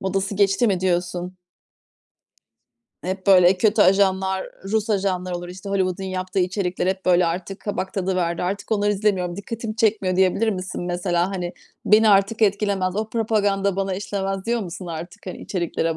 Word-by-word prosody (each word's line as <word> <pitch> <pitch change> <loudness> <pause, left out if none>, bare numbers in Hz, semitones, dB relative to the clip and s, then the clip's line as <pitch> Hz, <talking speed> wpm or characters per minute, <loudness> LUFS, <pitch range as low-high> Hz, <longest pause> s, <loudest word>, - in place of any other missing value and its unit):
modası 195 +1 -1
geçti 200 +3 +3
mi 190 -4 +1
diyorsun? 180 0 -1 1.7
Hep 185 +1 -4
böyle 185 -1 +6
kötü 210 +2 +4
ajanlar, 190 0 +2 0.2
Rus 215 +2 -1
ajanlar 185 -3 0
olur, 175 0 -5
işte 185 +2 -9
Hollywood'un 190 -1 -1
yaptığı 185 0 -3
içerikler; 180 -1 -1
hep 190 0 -1
böyle 180 -1 +4
artık 180 +3 -4
kabak 195 -2 -3
tadı 190 -1 -1
verdi. 170 -2 -1
Artık 195 +4 -3
onları 205 -1 +2
izlemiyorum, 190 -4 0
dikkatimi 220 +2 -5
çekmiyor 205 -5 +1
diyebilir 190 +4 +2
misin 185 -3 -4
mesela? 175 0 0
Hani 180 -2 -4 0.3
beni 215 +1 +5
artık 200 +2 +3
etkilemez, 200 -2 +1
o 215 0 -2
propaganda 205 -4 +1
bana 195 -1 -1
işlemez, 195 0 -3
diyor 235 0 +1
musun 185 -1 -7
artık, 175 +5 -8
hani 185 - -6
içeriklere 165 -3 -2
190 Hz, 160 wpm, -22 LUFS, 180-205 Hz, 1.7 s, böyle